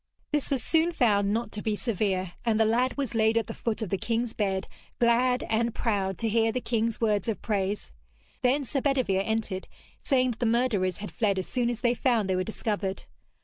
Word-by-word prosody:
This 295 Hz, -2 st, 0 dB
was 270 Hz, -5 st, 0 dB
soon 325 Hz, +1 st, +2 dB
found 205 Hz, -7 st, +3 dB
not 230 Hz, +3 st, -1 dB
to 210 Hz, -, -5 dB
be 215 Hz, -1 st, 0 dB
severe, 195 Hz, -5 st, -1 dB
and 225 Hz, -2 st, +1 dB
the 220 Hz, -, +5 dB
lad 245 Hz, +5 st, +1 dB
was 275 Hz, -3 st, -1 dB
laid 220 Hz, 0 st, +3 dB
at 230 Hz, -, +1 dB
the -, -, -6 dB
foot 230 Hz, -1 st, -2 dB
of 200 Hz, -, -5 dB
the 195 Hz, -, 0 dB
king's 230 Hz, +3 st, -1 dB
bed, 195 Hz, -3 st, -1 dB, 0.3 s
glad 245 Hz, +2 st, +3 dB
and 230 Hz, +1 st, 0 dB
proud 195 Hz, -5 st, 0 dB
to 230 Hz, -, -1 dB
hear 225 Hz, +1 st, +2 dB
the 255 Hz, -, -1 dB
king's 230 Hz, -2 st, -1 dB
words 210 Hz, -2 st, +1 dB
of 220 Hz, -, -2 dB
praise. 200 Hz, -, -1 dB, 0.5 s
Then 265 Hz, +3 st, +2 dB
Sir 275 Hz, +1 st, -2 dB
Bedevere 255 Hz, -9 st, +1 dB
entered, 220 Hz, -3 st, -2 dB, 0.4 s
saying 255 Hz, -3 st, +2 dB
that 230 Hz, -, -8 dB
the 240 Hz, -, +1 dB
murderers 225 Hz, -6 st, +1 dB
had 210 Hz, -, -7 dB
fled 205 Hz, -5 st, +1 dB
as 185 Hz, -, -1 dB
soon 245 Hz, -2 st, 0 dB
as 240 Hz, -1 st, -3 dB
they 240 Hz, -1 st, +3 dB
found 235 Hz, -5 st, +1 dB
they 190 Hz, -, +1 dB
were 185 Hz, -, +1 dB
discovered. 205 Hz, -2 st, -3 dB
225 Hz, 215 wpm, -27 LUFS, 205-245 Hz, 0.5 s, the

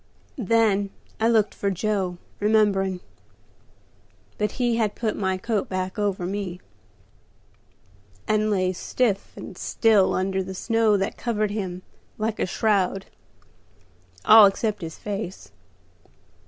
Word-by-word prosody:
Then 210 Hz, -3 st, +2 dB, 0.3 s
I 225 Hz, -, +3 dB
looked 220 Hz, -3 st, +3 dB
for 200 Hz, -, -2 dB
Joe, 190 Hz, -2 st, -1 dB, 0.2 s
remembering; 200 Hz, -3 st, +2 dB, 1.4 s
but 210 Hz, -1 st, 0 dB
he 240 Hz, -2 st, 0 dB
had 215 Hz, -3 st, 0 dB
put 220 Hz, -2 st, -2 dB
my 190 Hz, -2 st, -1 dB
coat 215 Hz, +1 st, -2 dB
back 185 Hz, +1 st, -3 dB
over 200 Hz, -3 st, -1 dB
me, 185 Hz, -1 st, -4 dB, 1.7 s
and 215 Hz, 0 st, +2 dB
lay 185 Hz, -3 st, +1 dB
stiff 205 Hz, +2 st, -1 dB
and -, -, -8 dB
still 215 Hz, -4 st, +2 dB
under 190 Hz, +1 st, 0 dB
the 190 Hz, 0 st, -6 dB
snow 225 Hz, 0 st, +2 dB
that 195 Hz, 0 st, -2 dB
covered 215 Hz, -3 st, -1 dB
him 185 Hz, -3 st, -4 dB, 0.3 s
like 220 Hz, 0 st, -2 dB
a -, -, 0 dB
shroud, 195 Hz, -1 st, 0 dB, 1.2 s
all 215 Hz, -2 st, +9 dB
except 205 Hz, +1 st, -2 dB
his 160 Hz, -1 st, -6 dB
face. 200 Hz, -2 st, -6 dB
205 Hz, 120 wpm, -24 LUFS, 190-220 Hz, 1.7 s, all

